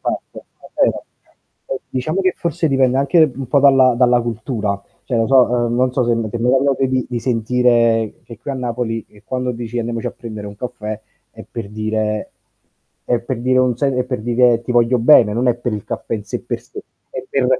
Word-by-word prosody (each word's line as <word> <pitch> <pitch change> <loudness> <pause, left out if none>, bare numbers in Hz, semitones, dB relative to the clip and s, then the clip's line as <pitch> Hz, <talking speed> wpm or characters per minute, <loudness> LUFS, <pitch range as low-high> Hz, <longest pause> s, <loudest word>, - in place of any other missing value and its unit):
Va - - -1 0.5
bene. - - +3 0.7
Eh, 135 - -4
diciamo 155 +9 -2
che 185 -1 +2
forse 170 -1 -1
dipende 130 -1 +2
anche 145 +2 +4
un 135 -1 -6
po' 140 +1 +3
dalla 135 -3 +5
dalla 125 -1 +4
cultura, 110 -3 -3 0.2
cioè 120 - -1
lo 115 - +2
so 125 -3 +3
non 125 +2 +1
so 125 -2 +1
se 120 - +1 0.2
ti - - -3
è - - -4
mai 125 +2 +2
capitato 135 -1 +2 0.2
di 120 -1 -2
sentire 115 -2 +2
che 115 -2 -11
qui 130 - -6
a 135 - -3
Napoli, 120 -3 -3
che 105 - -21
quando 125 -1 -2
dici: 120 0 -5
"Andiamoci 115 0 -3
a - - -1
prendere 110 -3 -8
un 100 0 -9
caffè" 110 -3 -5 0.3
è - - -12
per 115 -4 -6
dire 110 0 -2 0.7
è 120 -1 0
per 120 0 -4
dire 130 +1 +2
un 125 -2 +2
se 135 0 0
è 125 0 0
per 125 -3 -4
dire: 120 0 +3
"Ti 125 - -3
voglio 120 +1 +3
bene," 115 -3 +6
non 120 +3 +1
è 120 - +3
per 120 -1 -3
il 105 -2 -4
caffè - - -4
in 105 -1 -5
sé - - -4
per - - -4
sé, - - -10 0.3
è 130 - -5
per 135 -2 +1
120 Hz, 210 wpm, -18 LUFS, 115-130 Hz, 0.7 s, bene